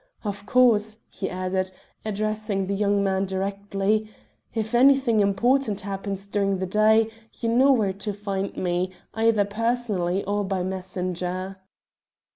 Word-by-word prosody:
Of 205 -1 -5
course," 220 -4 +4
he 195 - -4
added, 185 0 -1 0.3
addressing 215 -1 -1
the 200 - -2
young 200 0 +2
man 190 0 +1
directly, 200 +2 -1 0.4
"if 220 0 -3
anything 260 -2 +5
important 210 +3 +2
happens 195 0 -4
during 200 -1 0
the 190 - -2
day 215 +3 +3 0.3
you 230 - -1
know 260 +4 +5
where 215 -7 +2
to 205 +2 -4
find 200 -1 -4
me, 180 +1 -1 0.2
either 225 -2 +3
personally 210 -4 -1
or 205 +1 0
by 190 -2 -1
messenger." 185 0 -3
200 Hz, 130 wpm, -25 LUFS, 190-220 Hz, 0.4 s, anything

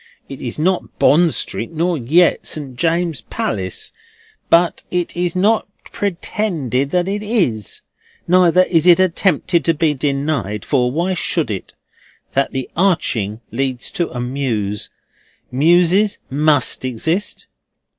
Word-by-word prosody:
It 135 - -9
is 120 - -4
not 180 +4 -1
Bond 165 +2 +4
Street 115 - -3
nor 170 +2 0
yet 160 +7 +2
St. 140 -5 -5
James's 165 +1 0
Palace; 95 -3 -3 0.6
but 170 +1 +3
it 180 -1 -2
is 175 0 -1
not 210 +4 +2 0.2
pretended 170 - -2
that 180 +3 0
it 205 +1 -2
is. 180 - -1 0.4
Neither 180 0 +5
is 170 -2 +2
it 175 0 +7
attempted 180 -2 +2
to 165 - +2
be 155 -1 +2
denied—for 135 -4 -1
why 175 +6 0
should 165 -6 -1
it?—that 130 +6 -6
the 130 -1 -3
Arching 120 - 0
leads 130 +1 -3
to 170 - -1
a 125 - -6
mews. 120 -6 -2 0.6
Mewses 175 +8 +3
must 145 -2 +2
exist. 160 - -2
160 Hz, 125 wpm, -18 LUFS, 130-180 Hz, 0.6 s, it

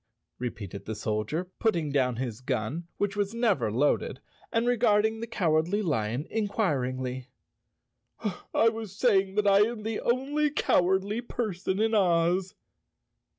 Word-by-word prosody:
repeated 100 -5 -6
the 110 - -4
Soldier, 110 - -2
putting 170 -10 +1
down 130 -3 +1
his 120 -2 -4
gun 130 +6 -2
which 205 0 -1
was 205 +2 -1
never 205 - +1
loaded, 130 +7 +1 0.3
and 230 0 +1
regarding 220 -2 +3
the 230 - -4
Cow¬ 170 -8 +1
ardly 200 +6 -1
Lion 125 - -1
inquiringly. 130 - -1 1.2
"I 230 - +4
was 220 -3 -7
saying 195 -5 +3
that 210 0 +2
I 200 0 +6
am 215 +1 +1
the 220 0 -2
only 280 +5 +1
cowardly 195 -5 +1
person 200 -6 -3
in 220 +1 +2
Oz." 180 -1 +2
190 Hz, 135 wpm, -28 LUFS, 130-220 Hz, 1.2 s, I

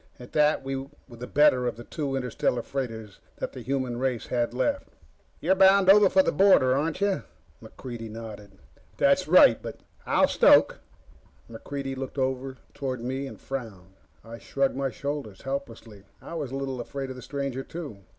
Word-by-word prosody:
At 125 - -12
that, 150 -2 +3
we 135 0 -3
were 135 +1 -7 0.2
the 120 +1 -9
better 130 -4 +4
of - - -2
the 120 - -10
two 140 0 -4
interstellar 125 -1 -1
freighters 115 -7 -5 0.2
the - - -6
human 130 -3 -2
race 130 -3 -1
had 120 -1 -1
left. 280 - -1 0.5
"You're - - +2
bound 190 0 +6
over 205 -1 +6
the - - +1
border, 185 -10 +5
aren't 155 +6 -1
you?" 200 -1 +1 0.4
MacReidie 120 -3 -8
nodded. 105 -3 -10 0.4
"That's - - +3
right. - - +6
But - - -8
" - - -31
"I'll - - +4
stoke." - - +5 0.7
MacReidie 135 +4 -6
looked 135 +1 -6
over 130 0 -2 0.2
toward 130 -4 -4
me 135 +2 -3
and - - -10
frowned. 105 -9 -7 0.3
I 115 +1 -9
shrugged 135 +2 -1
my 135 0 -1
shoulders 140 -8 -6
helplessly. 115 -7 -6
I - - -10
was 150 -6 -4
a 135 - -6
little 135 -2 -3
afraid 135 +2 -6
of - - -7
the 125 - -10
stranger, 140 0 -4
too. 145 -8 -8
130 Hz, 170 wpm, -26 LUFS, 120-140 Hz, 0.7 s, bound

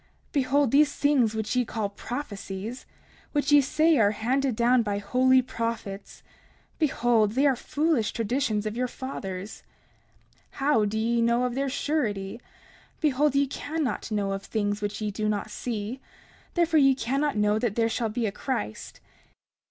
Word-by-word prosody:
30:14 - - -38
Behold, 275 -2 +2
these 290 +1 +4
things 260 -7 +2
which 220 +2 -2
ye 250 - +3
call 220 -3 -3
prophecies, 205 -1 -6 0.5
which 290 -1 +1
ye 290 0 +8
say 310 +2 +3
are 205 -2 +5
handed 250 +4 0
down 240 +2 +4
by 205 -2 -1
holy 255 +5 +3
prophets, 230 -5 -5 0.6
behold, 240 -8 +2
they 270 +4 +2
are 275 -2 +4
foolish 295 -2 0
traditions 225 -2 -1
of 215 0 -3
your 250 +1 0
fathers. 205 -7 -6 0.8
30:15 - - -33
How 275 -6 +2
do 210 +1 -2
ye 230 +2 +1
know 235 +1 +2
of 250 -1 -1
their 275 +2 -1
surety? 230 -8 -2 0.6
Behold, 295 -1 +2
ye 280 0 +4
cannot 290 -1 -3
know 205 -2 -1
of 195 0 -3
things 205 -1 -2
which 205 +1 -3
ye 210 -1 -1
do 215 +1 -2
not 210 0 -2
see; 230 +2 -4 0.5
therefore 335 -2 +3
ye 270 -2 +5
cannot 275 +1 -1
know 210 +1 +2
that 220 -3 -1
there 230 -1 +2
shall 230 0 -1
be 225 +2 -2
a 205 - -1
Christ. 230 - -5
235 Hz, 165 wpm, -26 LUFS, 210-275 Hz, 0.8 s, ye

